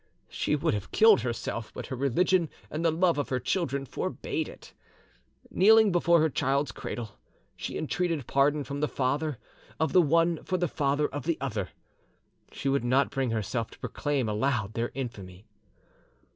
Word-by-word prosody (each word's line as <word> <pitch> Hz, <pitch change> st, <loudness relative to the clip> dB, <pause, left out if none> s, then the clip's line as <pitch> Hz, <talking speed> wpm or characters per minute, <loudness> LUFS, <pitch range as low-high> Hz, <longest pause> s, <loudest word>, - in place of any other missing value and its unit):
She -, -, 0 dB
would 145 Hz, -, 0 dB
have 105 Hz, -2 st, -4 dB
killed 220 Hz, -2 st, +6 dB
herself, 115 Hz, -2 st, -4 dB
but -, -, -5 dB
her 130 Hz, -, -5 dB
religion 165 Hz, +6 st, +2 dB, 0.2 s
and 155 Hz, +2 st, -3 dB
the 165 Hz, -, +4 dB
love 170 Hz, -1 st, +2 dB
of 135 Hz, -4 st, -2 dB
her 130 Hz, -, 0 dB
children 140 Hz, 0 st, -1 dB
forbade -, -, -3 dB
it. -, -, -14 dB, 0.8 s
Kneeling 220 Hz, +2 st, +6 dB
before 170 Hz, -1 st, +4 dB
her 160 Hz, -, +3 dB
child's 140 Hz, +2 st, 0 dB
cradle, 115 Hz, -5 st, -7 dB, 0.4 s
she -, -, -5 dB
entreated 165 Hz, -3 st, -1 dB
pardon 145 Hz, +3 st, +2 dB
from 140 Hz, +1 st, -5 dB
the 150 Hz, -, +1 dB
father 140 Hz, +2 st, -1 dB, 0.4 s
of 160 Hz, -, 0 dB
the 185 Hz, -, +7 dB
one 165 Hz, +1 st, +2 dB
for 185 Hz, -, -1 dB
the 175 Hz, 0 st, 0 dB
father 145 Hz, 0 st, 0 dB
of 145 Hz, -, -6 dB
the 170 Hz, -, +1 dB
other. 105 Hz, -8 st, -3 dB, 0.8 s
She -, -, -5 dB
would 135 Hz, -2 st, +1 dB
not 130 Hz, +3 st, +2 dB
bring 135 Hz, -2 st, -1 dB
herself 115 Hz, +1 st, -2 dB
to -, -, -15 dB
proclaim 145 Hz, -5 st, -2 dB
aloud 110 Hz, -1 st, 0 dB
their 115 Hz, +1 st, -1 dB
infamy. 105 Hz, -7 st, -7 dB
140 Hz, 170 wpm, -28 LUFS, 120-165 Hz, 0.8 s, the